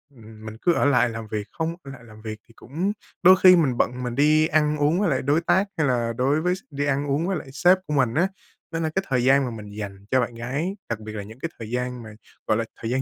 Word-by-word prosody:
ừm, 110 -1 -14
mình 110 0 -8
cứ 175 - +3
ở - - +1
lại 125 -3 +4
làm 115 -1 -6
việc 105 0 -4
không 165 +1 -3
ở 135 - -9
lại 130 -3 -12
làm 110 -1 -15
việc 110 -1 -6
thì 115 - -20
cũng 170 - -3 0.3
đôi 185 +1 +9
khi 185 -1 +9
mình 135 -8 +2
bận 125 +1 0
mình 120 -1 -3
đi 155 +2 +4
ăn 150 -1 +2
uống 150 +5 +2
với 200 -4 +2
lại 135 - 0
đối 145 +5 +2
tác 190 +4 +2
hay 150 -3 +2
là 120 -2 0
đối 140 +5 +2
với 180 +2 +1
s - - -10
đi 145 0 -2
ăn 140 +1 0
uống 155 +6 0
với 195 - 0
lại 145 - -8
sếp 180 +5 +4
của 150 - -2
mình 130 -5 +2
á. 175 +4 +3 0.4
Nên 165 0 -2
là 160 - 0
cái 190 - +1
thời 125 -2 +1
gian 135 +1 +4
mà 120 - -4
mình 105 -2 -8
dành 100 -1 -7
cho 130 - +4
bạn 120 - -3
gái, 140 +11 -3
đặc 115 -2 -2
biệt 110 0 -8
là 105 -2 -5
những 110 +5 -12
cái 165 - -3
thời 110 -1 -7
gian 125 -1 -3
mà, 110 - -10 0.4
gọi 110 - +2
là, 115 - 0 0.2
thời 115 - -3
gian 130 +1 +1
130 Hz, 290 wpm, -24 LUFS, 115-155 Hz, 0.4 s, đôi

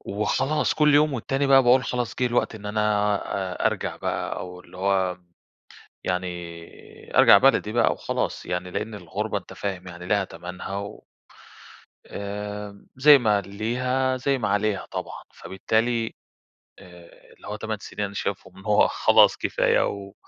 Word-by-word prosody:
وخلاص 130 +9 0
كل 150 -1 +4
يوم 150 0 +4
والتاني 135 +3 -1
بقى 135 -1 +6
باقول 125 +1 +4
خلاص 125 -2 -2
جه 125 - +3
الوقت 120 -1 0
إن 105 -1 -9
أنا 105 0 +1 0.4
آآ، - - -1
أرجع - - -2
بقى - - -3
أو 90 0 -7
اللي 90 - -16
هو، 95 -1 0 0.9
يعني 90 -2 -6
أرجع - - +8
بلدي - - +3
بقى - - +3
وخلاص - - -3
يعني، 90 +1 -3
لأن 105 +3 -4
الغُربة 105 +3 -3
أنت 95 - -9
فاهم 95 -2 -5
يعني 90 0 -9
ليها 100 +1 +2
تَمَنها 90 +3 -7
و 100 0 -7 1.0
آآ، 105 0 -6
زي 145 +3 +8
ما 105 -5 +2
ليها، 125 +6 -1
زي 135 +2 0
ما 115 - -2
عليها 100 -1 0
طبعًا، - - -6
فبالتالي، 115 +4 -1 0.7
آآ، 90 -1 -16
اللي - - -15
هو - - -4
8 - - -4
سنين 105 - -4
أنا 100 - -8
شايفهم 100 - -5
إن 95 - -13
هو 105 -1 +4
خلاص - - +4
كفاية، - - +1
و 100 -1 -7
105 Hz, 155 wpm, -24 LUFS, 95-120 Hz, 1.0 s, أرجع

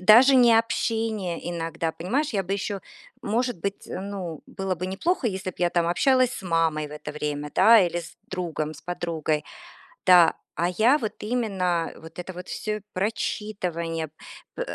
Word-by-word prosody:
даже 240 +7 +8
не 240 -2 +7
общение 220 -6 -1
иногда. 165 -1 -2
Понимаешь, 265 - -1
я 200 -4 0
бы 190 +2 -4
еще, 200 0 -2 0.4
может 235 0 0
быть, 200 +3 -4
э, - - -4
ну, 190 -5 -5
было 195 -1 -3
бы 180 +2 -4
неплохо, 255 - 0
если 190 -3 -2
б - - -22
я 175 -1 +2
там 170 -1 +1
общалась 255 +7 +3
с - - -7
мамой 165 -3 +1
в - - -16
это 150 0 -7
время, 150 -1 -3
да, 230 -1 +8
или 175 -1 +1
с 170 - -12
другом, 160 -4 -3
с - - -14
подругой. 165 -3 -2 0.6
Да, 175 -2 +7 0.2
а 170 +1 +1
я 220 +10 +4
вот 220 -7 -3
именно 195 -7 0
вот 165 +2 -12
это 180 +1 -6
вот 180 +1 -8
всё 215 -1 -3
прочитывание, 180 -5 -2 0.5
э, - - -2
185 Hz, 170 wpm, -25 LUFS, 165-215 Hz, 0.6 s, даже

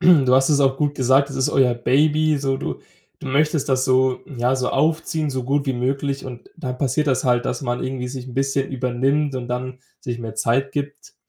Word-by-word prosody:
Du 140 -8 +5
hast 135 +2 +4
es 145 -1 +3
auch 135 -1 +3
gut 145 -1 0
gesagt: 135 +1 +3
Das - - -6
ist 130 - +1
euer 130 -3 +3
Baby, 150 +5 +2
so 135 -1 -1
du - - -5 0.4
du - - -9
möchtest 150 0 +1
das 130 0 +2
so, 130 0 +2
ja, 125 -1 0
so 130 -1 -1
aufziehen, 155 0 0
so 130 -1 -3
gut 140 +3 0
wie 135 - +1
möglich. 135 +3 -2
und 125 -2 -10
dann 130 -6 -5
passiert 145 +3 0
das 130 -1 +1
halt, 120 -1 +2
dass - - -3
man 120 -1 -2
irgendwie 130 -1 -3
sich 130 -1 -7
'n 120 - -10
bisschen 135 0 0
übernimmt 135 +3 0
und 125 -1 -5
dann 130 +1 -4 0.2
sich 120 -1 -4
mehr 115 -2 -6
Zeit 125 +5 0
gibt. 145 0 -5
135 Hz, 220 wpm, -21 LUFS, 125-140 Hz, 0.4 s, Du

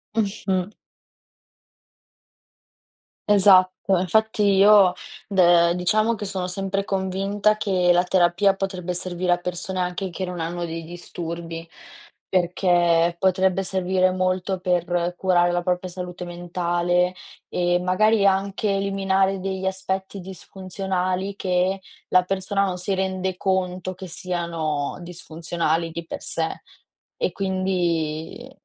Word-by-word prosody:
Mh-mh. 195 -3 -1 2.6
Esatto. 190 -1 +5
Infatti 215 +4 +1
io 195 -2 +6 0.3
d 175 -3 +4
diciamo 215 +6 +2
che 210 - -7
sono 190 -2 -2
sempre 195 +2 -2
convinta 195 +2 0
che 185 -4 +2
la 175 +1 +3
terapia 185 +2 +3
potrebbe 185 -2 -3
servire 180 0 0
a 175 - +1
persone, 180 +1 -4
anche 180 +2 -3
che 190 - -5
non 180 -1 -5
hanno 170 +2 -3
dei 165 -1 -5
disturbi, 170 -1 -7 0.6
perché 175 -2 +2
potrebbe 190 0 +2
servire 185 0 +1
molto 185 0 -1
per 175 -1 0
curare 175 -2 +3
la 175 0 0
propria 180 +1 -1
salute 180 0 -7
mentale 175 +1 -1 0.3
e 175 0 +1
magari 200 +3 +3
anche 195 +2 +1
eliminare 195 -1 +1
degli 190 0 -3
aspetti 190 +1 -3
disfunzionali, 190 +1 -4
che 185 0 0 0.3
la 185 0 +4
persona 195 +1 0
non 185 -2 -3
si 180 +2 -1
rende 190 0 -2
conto 185 -1 -1
che 185 +1 -9
siano 170 -5 -3
disfunzionali, 165 -1 -3
di 170 +1 -6
per - - -7
sé. - - -2 0.6
E 480 - 0
quindi 180 +1 -2
185 Hz, 115 wpm, -23 LUFS, 175-195 Hz, 2.6 s, io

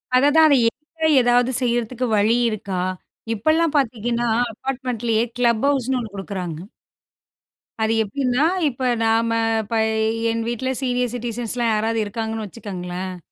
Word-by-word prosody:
அததான், 290 +5 +6
அதை 280 - +5
எங்க 315 +5 -4
ஏதாவது 245 +1 +3
செய்றதுக்கு 240 0 -1
வழி 215 +3 +3
இருக்கா? 195 -4 -3 0.5
இப்பெல்லாம் 310 +8 +1
பாத்தீங்கன்னா, 240 -2 0 0.2
அப்பார்ட்மெண்ட்லயே 240 -3 -1
கிளப் 235 -1 +2
ஹவுஸ்னு 265 -2 +1
ஒண்ணு 220 -4 -7
குடுக்குறாங்க. 185 -5 -5 1.2
அது 220 +1 +2
எப்டின்னா, 255 +5 0 0.2
இப்ப 260 -1 -4 0.2
நாம்ம 225 +1 +2 0.3
இப்ப 220 +3 -4 0.5
என் 230 0 -1
வீட்ல 250 +2 -2
சீனியர் 250 -2 0
சிட்டிசன்ஸ்லாம் 240 0 -2
யாராவது 225 +1 0
இருக்காங்கன்னு, 220 +1 -4
வச்சுக்கங்களேன். 185 -3 -6
235 Hz, 115 wpm, -21 LUFS, 215-255 Hz, 1.2 s, அததான்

